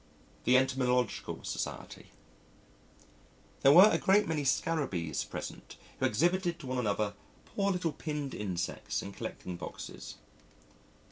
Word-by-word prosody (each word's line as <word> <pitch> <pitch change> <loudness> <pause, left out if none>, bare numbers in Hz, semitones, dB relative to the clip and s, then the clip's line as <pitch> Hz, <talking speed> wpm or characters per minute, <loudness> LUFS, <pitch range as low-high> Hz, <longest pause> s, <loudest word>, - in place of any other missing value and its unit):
The 125 +2 +6
Entomological 125 -2 0
Society - - -5 1.5
There 135 - +7
were 190 +8 +9
a - - +2
great 205 +2 +4
many 155 -3 -1
Scarabees 130 - 0
present - - -7 0.2
who - - +3
exhibited 175 - +1
to 165 - -11
one 130 0 -2
another 105 -2 0 0.3
poor 200 -1 0
little 180 -3 0
pinned 150 -3 -4
insects 90 -4 -3
in 100 - -6
collecting 90 -2 -6
boxes - - -8
135 Hz, 120 wpm, -31 LUFS, 105-170 Hz, 1.5 s, were